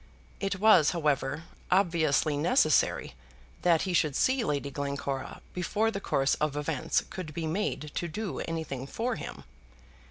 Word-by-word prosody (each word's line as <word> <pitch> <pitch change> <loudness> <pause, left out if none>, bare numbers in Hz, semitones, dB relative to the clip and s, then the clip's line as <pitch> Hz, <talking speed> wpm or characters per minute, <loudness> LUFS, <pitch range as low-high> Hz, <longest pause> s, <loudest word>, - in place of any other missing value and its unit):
It 195 -1 -2
was, 205 -8 +6
however, 150 -1 0 0.3
obviously 165 -5 +2
necessary 155 - +2 0.5
that 170 -3 +3
he 185 - -2
should 155 -5 +2
see 260 -1 +2
Lady 145 -6 -1
Glencora 140 -1 -4
before 210 +5 0
the 195 - -4
course 135 -6 +1
of 150 -1 0
events 150 +1 0
could 155 -5 -6
be 165 - -2
made 160 -3 -2
to 175 - -2
do 190 +4 -4
anything 150 -5 -4
for 235 - -2
him. - - -7
160 Hz, 145 wpm, -29 LUFS, 145-195 Hz, 0.5 s, was